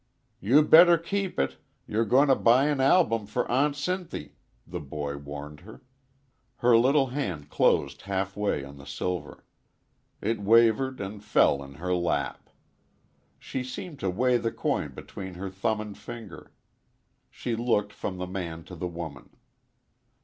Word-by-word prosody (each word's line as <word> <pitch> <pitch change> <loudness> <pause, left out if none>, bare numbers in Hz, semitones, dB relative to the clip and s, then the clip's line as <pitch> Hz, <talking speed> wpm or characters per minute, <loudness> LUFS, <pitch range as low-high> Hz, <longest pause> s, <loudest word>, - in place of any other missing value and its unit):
"You 130 +10 +5
better 170 +3 +8
keep 195 +3 -3
it; - - 0 0.3
you're 115 +2 0
going 135 +7 +4
to 135 - +6
buy 125 +4 +4
an 145 -3 0
album 130 - +3
for 105 - -1
Aunt 140 +3 +2
Sinthy," 175 - -4 0.3
the - - -6
boy 70 0 -5
warned 75 +1 -8
her. 110 - -14 0.7
Her 120 0 +4
little 135 +4 +4
hand 90 - -4
closed - - +2
half 95 0 -3
way 105 -9 -1
on 70 0 -12
the 70 - -13
silver; 90 -1 -4 0.7
it 110 +2 -1
wavered 115 +5 +4
and 100 +1 -6
fell 85 -8 +3
in 70 0 -10
her 90 +5 -2
lap. 85 -1 -1 0.9
She 130 - -5
seemed 140 +4 -7
to 95 - -1
weigh 125 +7 +2
the 115 -1 -2
coin - - -2
between 95 -2 -8
her 95 +1 -5
thumb 100 +3 -1
and 105 -1 -6
finger. 115 -6 -10 0.8
She 120 - -4
looked 110 -3 0
from 95 - -5
the 90 - -3
man 85 -3 -5
to 90 +3 -10
the 90 +2 -4
woman. 85 -6 -8
105 Hz, 155 wpm, -27 LUFS, 90-130 Hz, 0.9 s, better